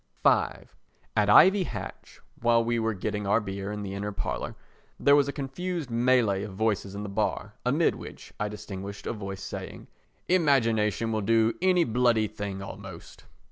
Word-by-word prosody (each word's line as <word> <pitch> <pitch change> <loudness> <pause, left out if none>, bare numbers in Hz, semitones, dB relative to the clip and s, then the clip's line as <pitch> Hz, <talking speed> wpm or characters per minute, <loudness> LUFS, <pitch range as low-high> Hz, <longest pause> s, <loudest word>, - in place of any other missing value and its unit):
v - - +2 0.5
At 105 -1 +3
Ivy 190 - +7
Hatch, - - -8 0.2
while 115 0 +4
we 120 0 0
were 110 -1 0
getting 105 +1 -3
our 100 +3 +4
beer 100 -1 -5
in 105 0 -4
the 95 -1 -5
inner 100 +1 -3
parlour, 100 - -4 0.4
there 140 - +6
was 145 -1 +4
a - - -1
confused 150 +1 -4
mêlée 115 -5 +2
of 100 -2 -7
voices 100 -2 -1
in 100 - -5
the - - -4
bar, 105 +1 -2
amid 145 +7 +2
which - - -10
I 105 - 0
distinguished 100 -1 -7
a - - -2
voice 100 -3 -6
saying: - - -7 0.4
"Imagination 115 - +2
will 110 -1 0
do 115 +2 +3
any 180 -2 +4
bloody 115 -3 +2
thing 100 -2 -5
almost." 95 -3 -10
110 Hz, 170 wpm, -27 LUFS, 100-125 Hz, 0.5 s, Ivy